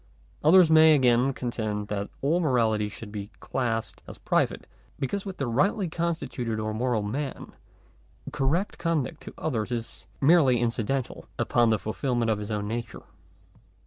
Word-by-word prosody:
Others 165 +1 +6
again 135 -6 +6
may 135 - -1
contend 110 -5 -3
that 100 -1 -3
all 160 +5 +2
morality 115 -9 +1
should 105 0 -9
be 105 -1 -6
classed 115 -4 -3
as - - -9
private; - - 0 0.3
because 195 +9 -3
with 190 - -6
the 135 - -2
rightly 175 - +1
con 170 +1 -1
stituted 120 -8 -4
or 110 0 -2
moral 115 -1 0
man, 135 +7 -4 0.8
correct 160 +9 -1
conduct 165 -2 -1
to - - -10
others 120 -7 -2
is 115 -1 -5
merely 140 -5 +5
incidental 120 +2 -2
upon 120 -1 +2
the 110 - +3
fulfilment 120 +2 -1
of 105 - 0
his 105 0 -6
own 105 -1 -2
nature. 115 +1 -5
125 Hz, 150 wpm, -26 LUFS, 110-150 Hz, 0.8 s, Others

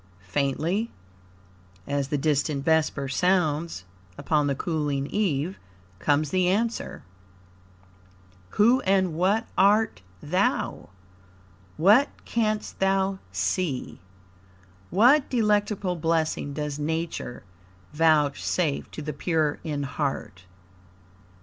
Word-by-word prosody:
Faintly, 155 - -1 1.0
as 140 -1 -1
the 145 - -1
distant 145 -1 0
vesper 160 -3 +1
sounds 165 - 0 0.3
upon 150 -2 +1
the 140 - 0
cooling 145 -3 -1
eve, 175 -1 -1 0.4
comes 145 +6 +1
the 185 -1 +2
answer: 225 +5 -1 1.5
"Who 235 +5 +5
and 190 -3 +2
what 195 +8 +1
art 205 - +3 0.2
thou? 180 - -1 0.9
What 210 - +5 0.2
canst 215 -2 -1
thou 195 0 +1
see? 125 - -2 0.9
What 255 +8 +4
delectable 210 -5 +1
blessing 160 -3 0
does 150 -1 -3
Nature 160 -4 -3 0.5
vouchsafe 150 0 +1
to 155 - -8
the 150 0 -4
pure 155 0 0
in 145 -3 -3
heart?" 135 - -4
160 Hz, 90 wpm, -26 LUFS, 145-195 Hz, 1.5 s, Who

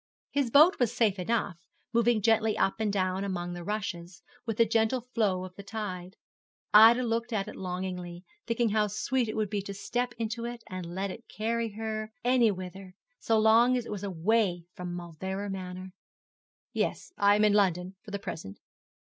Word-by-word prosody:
His 280 -4 +1
boat 305 +9 +6
was 245 -3 +2
safe 220 -5 +1
enough, 200 -2 -1 0.3
moving 235 -2 +3
gently 220 0 +3
up 195 - +1
and 215 -2 +1
down 185 -1 0
among 175 -3 -3
the 175 0 -6
rushes, 175 -3 -4 0.2
with 225 -2 -2
the 230 - +5
gentle 225 +3 +1
flow 215 -7 -1
of 185 - -10
the - - -8
tide. 195 -3 -6 0.6
Ida 225 +4 +8
looked 230 +1 -1
at 200 -3 -1
it - - -8
longingly, 180 -1 -5 0.2
thinking 230 -1 +1
how 210 0 +2
sweet 235 +4 -1
it - - -4
would 215 -2 -1
be 205 -2 -1
to 200 0 -7
step 245 +4 -2
into 230 +1 -3
it 235 0 -6
and 180 -2 -7
let 195 0 -2
it 230 +4 -11
carry 225 0 -2
her 215 0 -4
any 245 -2 +4
whither, 185 -1 -7 0.2
so 225 - +2
long 230 +3 +5
as 245 - -3
it - - -7
was 205 -2 -4
away 190 -1 +1
from 180 -1 -6
Mauleverer 190 +4 -5
Manor. 185 0 -6 0.8
'Yes, - - -2
I 205 0 +4
am 210 +1 +4
in 210 - +4
London 185 -2 +1
for 215 - -12
the 200 - -3
present.' 155 - -7
210 Hz, 185 wpm, -29 LUFS, 185-230 Hz, 0.8 s, Ida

